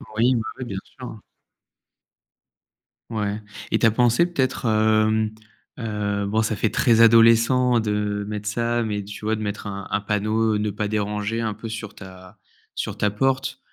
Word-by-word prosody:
Oui. 120 +4 +3
Oui, 115 - 0 0.2
oui 130 - -4
bien 100 -5 -5
sûr. 125 -4 -10 1.9
Ouais 105 -2 -2 0.3
et - - +2
tu - - +3
as 115 - +5
pensé 120 +7 +3
peut-être, 135 -7 -1
hem, 110 0 +2 0.5
heu, 105 -3 -2
bon 110 +3 +1
ça 110 -1 -1
fait 115 - +1
très 115 0 +3
adolescent 115 +2 +5
de 105 -1 -1
mettre 105 0 -4
ça, 120 +2 0
mais 105 -2 -2
tu 105 +1 -10
vois 110 +1 0
de - - -6
mettre 105 0 -4
un 100 -1 -6
un 100 - -1
panneau 110 +1 0
«Ne 105 0 -1
pas 105 +1 -3
déranger» 105 +1 -2
un 110 -2 -2
peu 110 +2 -8
sur 110 -1 -7
ta 95 +1 -13 0.4
sur - - -4
ta 105 - +1
porte. 135 +5 -1
110 Hz, 170 wpm, -23 LUFS, 105-115 Hz, 1.9 s, as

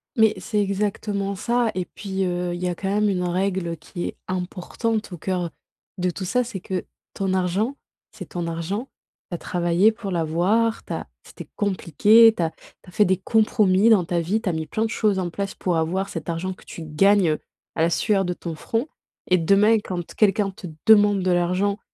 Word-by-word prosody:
Mais 220 -3 +4
c'est 210 +3 -1
exactement 200 0 -1
ça 235 +2 0
et 185 -1 -2
puis, 195 -1 -4
heu, 175 -1 -2
il 175 - -6
y 180 - 0
a 175 - -2
quand 195 - -4
même 210 +1 +2
une 180 -2 0
règle 180 -1 -1
qui 175 +3 -6
est - - -6
importante 190 +4 -3
au 175 - -6
cœur 180 0 -2 0.5
de 180 0 0
tout 185 - -6
ça, 250 +7 +1
c'est 230 -5 -6
que 185 +1 -4 0.3
ton 195 -1 -1
argent, 190 +8 0 0.4
c'est - - -10
ton 175 -1 -4
argent, 170 +9 -3 0.4
tu 175 - -2
as - - -4
travaillé 175 +4 +2
pour 220 -3 -6
l'avoir, 180 +8 +1
tu - - -5
as - - -5 0.2
c'était - - -11
compliqué, 205 +3 +5
tu 175 - -1
as 160 - -1
tu - - -20
as - - -13
fait 210 +3 +3
des 190 -1 +2
compromis 210 0 +3
dans 200 -6 +5
ta 175 0 0
vie, 180 +7 0
tu - - -6
as - - -1
mis 160 -1 -3
plein 220 +1 -1
de - - -2
choses 210 -4 +1
en 180 -2 -1
place 200 +3 -4
pour 175 -3 -1
avoir 185 +5 -1
cet 165 -1 -6
argent 170 +3 -2
que - - -19
tu 165 - -8
gagnes 170 +1 +3 0.4
à - - -1
la 165 - +4
sueur 195 +3 +1
de 180 - -1
ton 170 -1 -6
front 225 - -2 0.4
et 185 - +6
demain, 200 +6 +4
quand 180 -4 -6
quelqu'un 205 -1 +2
te 185 -1 -9 0.2
demande 205 -3 +5
de 185 - +2
l'argent 180 +4 +1
190 Hz, 210 wpm, -23 LUFS, 175-210 Hz, 0.5 s, et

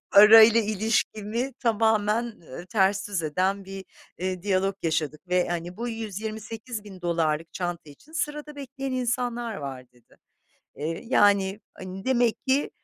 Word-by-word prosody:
parayla 220 +2 +9
ilişkimi 220 +3 -1
tamamen, 220 -1 +2
ııı, 175 - -10
ters 200 0 +1
düz 195 -5 -2
eden 185 +6 0
bir, 195 0 -8 0.3
eee, 185 0 -3
diyalog 195 -1 +1
yaşadık 160 +1 -2
ve 180 -1 +2
hani, 175 +1 -4
"Bu, 240 +2 -3
$128.000'lık 210 -7 -4
çanta 175 -4 -4
için 290 - -18
sırada 300 -2 -4
bekleyen 270 -1 -5
insanlar 245 -2 -1
var." 130 -3 -7
dedi. 120 -2 -25 0.6
Eee, 160 - -4
yani, 200 -3 +3
hani, 185 +1 -8
demek 245 -2 +1
ki 270 +2 +2
205 Hz, 125 wpm, -26 LUFS, 180-230 Hz, 0.6 s, parayla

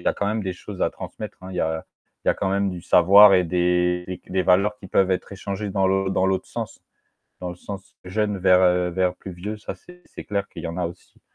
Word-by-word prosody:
y - - 0
quand 100 - -2
même 110 +1 -1
des 95 -1 -2
choses 95 +2 -7
à - - +2
transmettre 105 -2 -8
hein, 95 - -9
il 95 - -7
y - - 0
a 80 0 -1 0.4
il - - 0
y - - +7
a - - +1
quand 95 - -1
même 100 0 +1
du 90 -2 -7
savoir 100 +4 +7
et 90 -1 +4
des 90 +1 0
des 95 0 0
valeurs 100 +4 +3
qui 95 - -11
peuvent 95 0 +2
être 90 - -3
échangées 100 +1 -4
dans 95 0 +1
l'autre 95 0 +1
dans 95 0 +1
l'autre 95 -1 -1
sens, - - -6 0.6
dans 90 - -4
le - - -7
sens 95 +1 -9
jeune 105 +2 -1
vers 90 -1 +4
vers 90 0 0
plus 95 - -9
vieux, 100 +5 -5
ça - - -6
c'est 180 0 -16
c'est - - -10
clair 100 -1 -2
qu'il - - -9
y - - -3
en 85 +1 -5
a 90 - 0
aussi. 85 - -12
95 Hz, 255 wpm, -23 LUFS, 90-100 Hz, 0.6 s, y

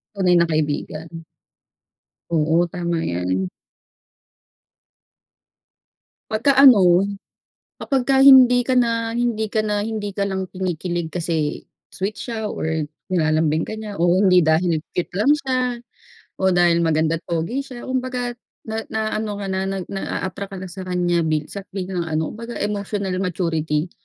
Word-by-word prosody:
Tunay 180 -3 +3
na 170 - +3
kaibigan. 155 +1 -3 1.1
Oo, 165 +1 +2
tama 170 -2 -2
yan. 90 +1 -1 2.8
'Pagka-ano, 215 -7 +6 0.8
kapag 270 -3 0
ka 270 +1 +2
hindi 260 -2 +8
ka 255 +1 0
na 230 -1 +1
hindi 230 -3 0
ka 215 +1 0
na 210 -1 0
hindi 210 -1 -3
ka 200 0 -1
lang 190 0 -2
kinikilig 175 -2 -3
kasi 160 -3 -2 0.2
sweet 200 +3 -4
siya 220 -3 -4
or 160 -1 -2 0.2
nilalambing 155 -2 +1
ka - - -7
niya 210 -2 -7
o 170 - +1 0.2
hindi 180 -3 +5
dahil 160 +2 +2 0.2
cute 180 - -2
lang 220 +9 +4
siya 260 -2 -1 0.8
o - - -7
dahil 175 -1 +4
maganda't 160 0 0
pogi 180 +12 -2
siya. 250 -3 -9
Kumbaga't 250 -2 -3 0.2
na 220 0 -5
naa-ano 215 0 -2
ka - - -3
na, 190 0 -1
nag 195 -2 -3
na-a-attract 195 0 -4
ka - - -6
na 190 - -6
sa 185 +1 -8
kanya 175 -1 +1
minsan 155 +6 -3
biglang 185 -3 -3
ano, 160 0 -1
kumbaga 230 +2 -8
emotional 200 -2 -2
maturity. 165 -3 -1
190 Hz, 135 wpm, -21 LUFS, 165-220 Hz, 2.8 s, hindi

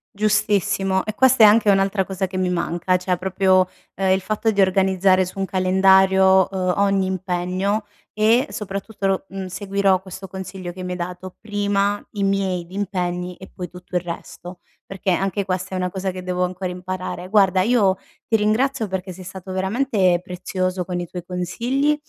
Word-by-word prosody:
Giustissimo, 200 -2 +1
e 215 - -3
questa 260 0 +5
è 215 - +11
anche 215 0 +5
un'altra 195 0 +3
cosa 190 0 -3
che 185 0 -6
mi 185 -1 +1
manca, 175 +1 0
cioè 180 0 -1
proprio, 185 0 +2 0.3
ehm, 190 0 0
il 190 - +2
fatto 215 +3 -1
di 205 - -1
organizzare 190 0 +3
su 185 +2 -8
un 195 - 0
calendario, 190 0 +4
uhm, 185 -2 0
ogni 195 -1 +2
impegno 185 +2 -1 0.3
e 220 +4 +3
soprattutto 200 0 -5
lo 195 0 +1
mhmm, 195 0 -5
seguirò 195 0 0
questo 190 0 -9
consiglio 190 -1 -7
che 185 - -9
mi 180 - -4
hai 180 - -5
dato: 180 +1 -6
prima 205 -1 0
i 200 -2 -2
miei 195 -3 0
impegni 180 -2 -3
e 190 - -12
poi 180 -2 -6
tutto 180 +1 -11
il - - -1
resto; 175 +1 -8 0.2
perché 195 -1 -3
anche 195 +2 0
questa 185 0 -3
è - - -1
una 180 0 -1
cosa 190 0 -3
che 185 0 -6
devo 180 0 -1
ancora 180 0 -3
imparare. 185 0 -5
Guarda 190 -3 +4
io 200 -4 +3 0.3
ti 225 - +2
ringrazio 220 +3 +1
perché 185 0 -4
sei 185 +1 -11
stato 185 +1 -8
veramente 190 -1 +1
prezioso 185 0 -3
con 180 -1 -3
i 175 - -3
tuoi 175 0 -7
consigli 240 +11 0
190 Hz, 180 wpm, -21 LUFS, 185-200 Hz, 0.3 s, è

